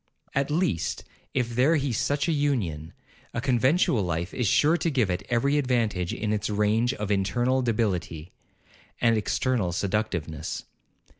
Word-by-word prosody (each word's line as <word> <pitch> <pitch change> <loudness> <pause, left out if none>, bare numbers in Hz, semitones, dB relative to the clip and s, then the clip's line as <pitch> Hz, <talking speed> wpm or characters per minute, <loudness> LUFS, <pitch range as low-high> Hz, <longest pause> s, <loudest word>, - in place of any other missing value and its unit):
At 140 +1 0
least, 155 - 0 0.3
if 120 -2 0
there 130 +7 +3
he 140 -4 0
such 140 +7 0
an 165 - +2
union, 105 - -1 0.4
a - - 0
conventual 130 - +2
life 85 0 -2
is 125 -4 0
sure 150 - +4
to 170 - 0
give 125 - +1
it 90 +1 -2
every 140 +5 +2
advantage 115 -9 0
in 105 0 -2
its 105 0 -1
range 105 +3 +2
of 105 0 -3
internal 120 +7 +1
debility, 95 -8 -1 0.7
and 115 -1 +3
external 110 -2 0
seductiveness. 85 -5 -2
115 Hz, 145 wpm, -26 LUFS, 95-135 Hz, 0.7 s, sure